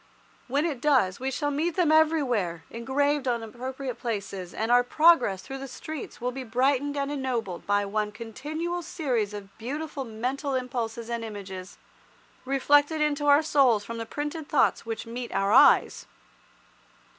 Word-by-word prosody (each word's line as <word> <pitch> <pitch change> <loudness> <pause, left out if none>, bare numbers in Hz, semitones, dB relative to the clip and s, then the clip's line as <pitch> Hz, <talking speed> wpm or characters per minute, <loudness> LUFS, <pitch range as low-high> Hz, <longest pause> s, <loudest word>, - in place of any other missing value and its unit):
When 280 +5 +1
it 285 -8 -3
does 255 -11 +3
we 260 +1 -2
shall 290 +2 -1
meet 315 +4 -1
them 350 -4 +3
everywhere 255 - +2
engraved 270 +4 0
on 235 -2 0
appropriate 255 +3 -6
places, 200 -6 -4
and 220 +2 -2
our 245 0 +6
progress 250 - +4
through 270 0 -7
the 275 - -6
streets 300 +3 -7
will 250 +1 -2
be 260 +1 -6
brightened 270 +4 +1
and 280 0 -1
ennobled 245 -10 -3
by 205 0 +2
one 210 +1 -1
continual 300 +11 -4
series 255 - -1
of 200 -1 -9
beautiful 285 +4 -4
mental 260 +5 -3
impulses 235 -3 -3
and 235 -1 -3
images, 195 -4 -8 0.7
reflected 290 +3 +3
into 295 -1 0
our 290 +2 +6
souls 265 -9 +3
from 230 0 -6
the 225 - -5
printed 295 +3 -5
thoughts 275 -4 +2
which 225 -1 -4
meet 240 +1 -6
our 195 +1 +1
eyes. - - +5
255 Hz, 155 wpm, -27 LUFS, 225-290 Hz, 0.7 s, our